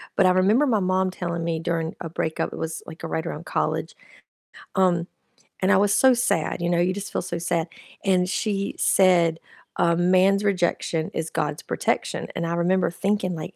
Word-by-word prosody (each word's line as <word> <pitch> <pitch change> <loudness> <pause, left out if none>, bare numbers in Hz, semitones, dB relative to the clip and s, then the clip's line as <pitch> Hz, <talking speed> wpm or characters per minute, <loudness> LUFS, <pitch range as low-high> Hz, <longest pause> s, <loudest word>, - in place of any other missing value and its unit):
but 195 - +4
I 185 - +5
remember 205 +10 +3
my 220 -4 +2
mom 185 0 +1
telling 170 -2 -4
me 165 -1 -1
during 165 -1 -2
a 165 - -5
breakup, 160 -1 -2
it - - -7
was, 160 0 -4
like, 160 0 -10
right 160 0 -3
around 170 0 -6
college, - - -2 0.8
um, 175 -2 +2 0.6
and 190 +1 +3
I 195 - +6
was 200 +1 +3
so 260 +5 +5
sad, 235 -10 0
you 170 - 0
know, 175 0 +2
you 180 +1 +2
just 200 +1 -6
feel - - 0
so 175 -1 -4
sad, 170 0 -1 0.4
and 185 -2 +3
she 200 +1 -2
said, 170 -4 +3 0.4
um, 170 - +3
"A 175 - +2
man's 185 +2 +4
rejection 175 -4 0
is 160 0 -3
God's 150 -1 -2
protection," - - -2
and 170 - -2
I 170 - -1
remember 180 +2 +1
thinking 195 +1 -1
like, 160 - -7
180 Hz, 195 wpm, -24 LUFS, 165-190 Hz, 0.8 s, I